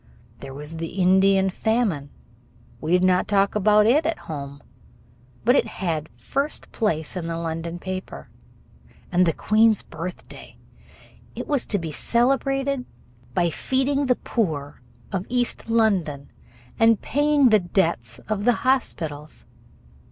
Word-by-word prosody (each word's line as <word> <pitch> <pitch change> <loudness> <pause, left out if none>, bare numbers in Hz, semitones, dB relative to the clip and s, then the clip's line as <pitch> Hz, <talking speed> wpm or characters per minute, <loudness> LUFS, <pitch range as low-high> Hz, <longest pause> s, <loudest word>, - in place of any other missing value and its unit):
There 135 - -9
was 150 +3 -5
the 165 +3 -5
Indian 190 +1 +4
famine 205 - 0 0.7
We 155 - -4
did 180 +1 +4
not 185 0 +3
talk 200 -1 +2
about 210 0 +4
it 275 +8 +4
at 330 +1 -1
home, 140 -2 -8 0.8
but 245 +3 +5
it 235 - +3
had 165 -7 -3
first 280 +2 -3
place 160 -9 -1
in 175 -2 -4
the 165 0 -3
London 165 +1 -4
paper. 185 - -6 0.8
And 180 0 +3
the - - +4
Queen's 220 0 +3
birthday, 175 +3 -9 0.8
it - - -5
was 285 -4 0
to 205 - +1
be 165 -4 -5
celebrated 270 - +1 0.5
by 170 -1 +2
feeding 270 - 0
the 250 - +3
poor 150 - -3 0.3
of 190 -1 -3
East 245 -2 -1
London 190 -11 +1 0.5
and 225 -1 +5
paying 290 -1 +3
the 215 -1 +5
debts 170 - -1
of 215 -2 -2
the 245 - +5
hospitals. 160 - -1
190 Hz, 135 wpm, -23 LUFS, 165-235 Hz, 0.8 s, but